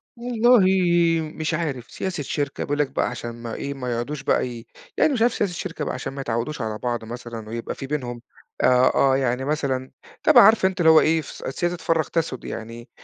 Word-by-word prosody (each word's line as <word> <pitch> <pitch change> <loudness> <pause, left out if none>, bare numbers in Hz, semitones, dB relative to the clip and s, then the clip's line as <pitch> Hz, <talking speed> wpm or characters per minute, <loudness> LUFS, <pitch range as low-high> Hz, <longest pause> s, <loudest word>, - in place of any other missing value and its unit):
والله 240 0 +3 0.7
مش 160 0 -2
عارف، 145 -7 -3
سياسة 185 -6 -4
شركة 140 0 -3
بيقول 145 +1 -2
لك 145 -2 +2
بقى - - 0
عشان 120 -1 -6
ما 115 -1 -7
إيه، 140 0 -4
ما 125 -2 -4
يقعُدوش 135 +5 -4
بقى - - +1
ي 120 -1 -8 0.3
يعني 310 - +3
مش 235 - -1
عارف 240 0 +4
سياسة 195 -4 -1
شركة 165 -4 -5
بقى - - -3
عشان 130 +1 -5
ما 140 - -5
يتعوّدوش 125 +4 -3
على 110 -2 -3
بعْض 120 -2 -2
مثلًا 115 -2 -8
ويبقى 115 0 -5
في 135 - -7
بينهم 125 -5 -4 0.4
آآ، 125 0 +5
آه 135 -1 +4
يعني 130 0 -1
مثلًا، 135 -4 -2 0.3
طبعًا - - +8
عارفة 215 -2 +6
أنتِ 190 0 -5
اللي 160 - +5
هو 160 - +8
إيه، 160 0 +2
فس - - -10
سياسة 175 +5 -2
فرّق 165 -2 0
تسُد 165 -6 -2
يعني، 115 +2 -7
135 Hz, 205 wpm, -23 LUFS, 120-165 Hz, 0.7 s, طبعًا